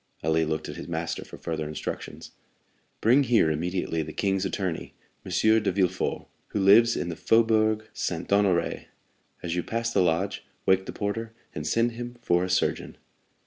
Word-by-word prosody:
Ali 80 +1 +2
looked 80 0 -2
at - - -7
his - - -7
master - - -3
for - - -11
further 80 -2 -4
instructions. 75 - -6 0.7
"Bring 125 +6 +5
here 115 - +3
immediately 85 +1 -1
the 80 0 -5
king's 95 +1 0
attorney, 95 -3 -3 0.3
M. - - -8 0.3
de 105 - +1
Villefort, 90 -1 0 0.2
who - - -3
lives 110 +5 +6
in 85 - -2
the 85 - -4
Faubourg 110 0 +2
Saint 85 -1 -3
Honoré. 100 -4 +2 0.6
As 85 -1 -2
you 90 - +1
pass 115 +4 -2
the - - +4
lodge, 90 +3 0 0.2
wake 95 0 +3
the - - -3
porter, 110 +2 -3 0.2
and 75 0 -4
send 115 +5 +2
him 120 +1 -7
for 90 -6 +2
a 95 - -2
surgeon." 90 - 0
95 Hz, 170 wpm, -26 LUFS, 85-110 Hz, 0.7 s, lives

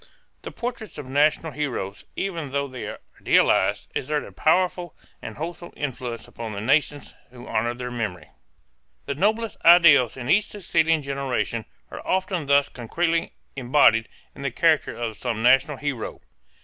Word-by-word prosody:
The - - -7
portraits 235 -3 -6
of 145 -3 -7
national 150 +4 +2
heroes, 125 -9 -4
even 170 -7 -3
though 140 +1 -1
they 130 -2 -7
are - - -6 0.2
idealized, - - +2
exert 150 +2 -2
a - - -11
powerful 180 +1 +1 0.3
and - - -8
wholesome 170 +2 -6
influence 125 -4 -5
upon 115 -2 -7
the 100 - -5
nations 145 +4 0 0.2
who 125 0 -12
honor 115 +2 -1
their 125 0 -6
memory. 90 -10 -5 0.7
The - - -2
noblest 215 +8 0
ideals 160 -9 +7
in 125 -2 -6
each 200 +8 +4
succeeding 165 -5 +1
generation 135 -5 -2 0.3
are - - -7
often 185 -4 -1
thus 140 0 +4
concretely 165 +8 -2 0.2
embodied 120 -4 +3 0.2
in - - -11
the 140 - -1
character 155 +3 +1
of 115 -2 -4
some 115 -3 -3
national 135 +4 +4
hero. 140 -6 -4
140 Hz, 150 wpm, -24 LUFS, 120-165 Hz, 0.7 s, ideals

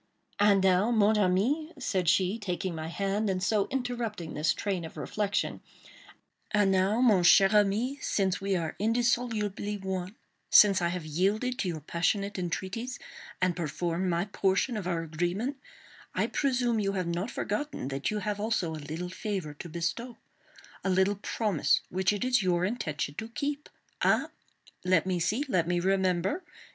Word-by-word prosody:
"And 200 -2 +5
now, 190 +3 +4
mon 215 -2 +3
ami," 235 - +1
said 185 -4 0
she, 190 +4 +2
taking 185 -3 -3
my 160 -1 -5
hand, 200 +4 -1
and 185 -1 -1
so 205 0 +2
interrupting 235 -9 -3
this 155 +1 +1
train 195 -4 -2
of 160 - -9
reflection, 205 -1 -2 0.9
"and 205 -2 +3
now, 190 +5 +2
mon 215 -7 +5
cher 195 +2 +6
ami, 210 +7 +2
since 190 -2 0
we 195 0 0
are 165 -3 -2
indissolubly 220 -2 0
one—since 190 +1 +2
I 170 - +2
have 170 -1 -3
yielded 205 - 0
to 195 - 0
your 160 -3 -3
passionate 195 +6 -1
entreaties, 195 +8 -3 0.5
and 185 -2 +2
performed 175 +2 -2
my 170 +1 0
portion 195 +3 0
of 205 -4 -3
our 170 -2 -1
agreement—I 195 - -4
presume 245 -4 +1
you 195 -1 0
have 185 -2 -1
not 170 +6 -2
forgotten 210 - -3
that 135 0 -2
you 215 - -2
also 210 -5 -1
have 155 - -6
a - - -10
little 170 +3 -4
favor 185 -6 -4
to 170 +4 -9
bestow—a 195 +4 -6
little 190 +2 +2
promise 200 -4 +1
which 190 +2 +1
it 205 +3 -2
is 250 -2 +3
your 180 -1 +1
intention 150 - -3
to 220 +1 -6
keep. 285 +4 -4 0.3
Ah! - - +3 0.5
let 180 -2 +3
me 185 -2 0
see! 215 - 0
Let 180 -9 +1
me 175 0 +1
remember! 190 - +1
195 Hz, 155 wpm, -29 LUFS, 180-220 Hz, 0.9 s, cher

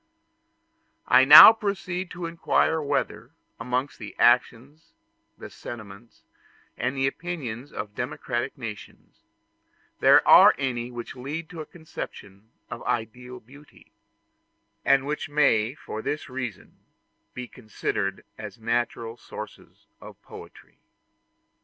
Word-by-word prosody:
I 130 +1 +6
now 150 +10 +11
proceed 190 -4 -4
to 175 -1 -7
inquire 165 -1 0
whether, 145 -1 -3 0.3
amongst 125 +4 -3
the 105 -3 -9
actions, 125 +5 +1 0.4
the - - -9
sentiments, 110 -1 -11 0.5
and 130 +3 -3
the 135 - +1
opinions 135 -5 -5
of 105 -1 -7
democratic 120 +1 -4
nations, 115 -5 -10 0.8
there - - +5
are - - +8
any 125 -3 -3
which 120 -1 -8
lead 150 +6 -6
to 165 -3 -7
a 155 - -9
conception 110 - -10 0.2
of - - -8
ideal 125 +2 -4
beauty, 145 +6 -19 0.9
and 135 -1 +3
which 150 +1 -4
may 135 -5 +2
for 110 -6 -8
this 150 +4 -4
reason 125 -6 -7 0.6
be 125 0 -6
considered 105 -4 -4
as 110 +2 -8
natural 115 0 -3
sources - - -11 0.2
of - - -13
poetry. - - -14
125 Hz, 115 wpm, -25 LUFS, 115-150 Hz, 0.9 s, now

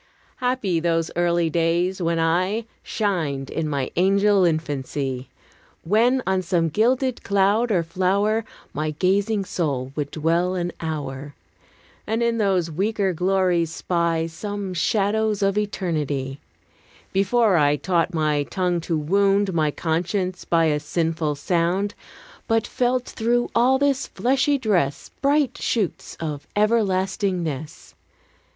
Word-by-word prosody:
Happy 250 -9 0
those 165 -1 0
early 175 -1 +2
days, 170 +3 0
when 170 -1 0
I 185 +7 +1 0.2
Shined 160 -11 -2
in 160 -2 -2
my 140 -3 -2
angel 195 +1 +4
infancy! 140 -5 -2 0.5
When 240 +8 +2
on 190 -1 +1
some 170 -2 +1
gilded 250 - +1
cloud 200 +4 +2
or 175 -5 +2
flower 195 +6 +1 0.3
My 155 +2 -2
gazing 200 +3 +1
soul 135 -8 -2
would 145 -2 -2
dwell 170 +4 0
an 175 -1 -2
hour, 145 -3 -5 0.7
And 225 +2 0
in 235 -1 +1
those 185 -5 +1
weaker 195 +3 0
glories 180 -2 +1
spy 170 -1 0
Some 200 +3 -5
shadows 210 +3 +1
of 195 0 +2
eternity: 150 -10 -2 0.7
Before 200 +1 +3
I 145 -1 +4
taught 170 +2 0
my 155 -3 +1
tongue 180 -1 -1
to 165 0 -1
wound 195 +5 +2
My 155 -2 +2
conscience 180 +4 -2
by 165 -1 +3
a 150 -2 +1
sinful 160 0 -1
sound; 175 +6 0 0.5
But 225 -1 +2
felt 250 0 0
through 240 +2 0
all 250 +3 +4
this 275 -1 +1
fleshy 270 +3 +1
dress 180 - 0
Bright 280 -2 +2
shoots 210 -7 -2
of 150 -3 -5
everlastingness. 190 - 0
180 Hz, 125 wpm, -23 LUFS, 160-210 Hz, 0.7 s, angel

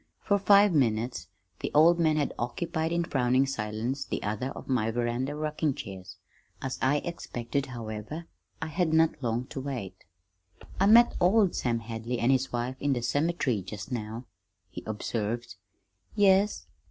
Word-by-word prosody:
For 200 -1 +2
five 200 0 +6
minutes 120 -4 0 0.3
the - - -3
old 170 +3 +6
man 160 -2 +3
had 145 - 0
occupied 160 +6 -2
in 170 0 +1
frowning 130 -3 +2
silence 115 +1 -3
the - - -4
other 105 +5 -2
of - - -9
my 120 -4 +1
veranda 120 +4 -1
rocking 150 -1 -1
chairs. 95 -1 -8 0.4
As 130 -1 -4
I 145 +3 +2
expected, 140 -5 -3
however, 115 +6 -6 0.4
I - - -1
had 160 0 0
not 160 -2 +3
long 120 0 -1
to 135 - -5
wait. 120 -9 -6 0.7
"I 195 - +4
met 235 +3 +7
old 190 +1 +4
Sam 115 -2 0
Hadley 115 +2 -4
an' 120 +3 +2
his 130 0 +1
wife 120 +2 -2
in 145 -1 +1
the 120 -2 -2
cemetery 145 - 0
just 95 +5 -8
now," 115 0 -4 0.5
he - - -7
observed. 110 +1 -3 0.6
"Yes?" 200 0 +3
130 Hz, 155 wpm, -28 LUFS, 115-160 Hz, 0.7 s, met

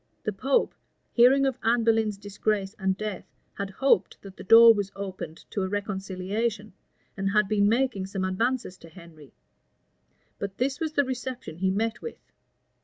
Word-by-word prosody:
[*] - - -44
The 215 - 0
pope, 265 +8 +1 0.4
hearing 260 +3 +5
of 265 -3 -1
Anne 230 +1 +2
Boleyn's 220 -2 +2
disgrace 205 0 -2
and 190 -1 0
death, 215 -2 -5 0.3
had 200 0 -5
hoped 200 -2 +1
that 195 -1 -11
the - - -10
door 230 +3 +9
was 200 -2 -3
opened 185 -5 -7
to 200 - -2
a 190 - -1
reconciliation, 205 +2 -3 0.4
and 195 0 -1
had 210 0 +2
been 205 0 +2
making 230 -5 0
some 195 -1 -3
advances 225 +1 -1
to 165 - -14
Henry: 160 -5 -15 1.1
but 195 -1 -5
this 265 +4 -1
was 315 -2 -3
the 285 -2 +2
reception 255 -8 -6
he 190 +1 0
met 225 +4 -1
with. 465 - -7
205 Hz, 170 wpm, -26 LUFS, 190-235 Hz, 1.1 s, door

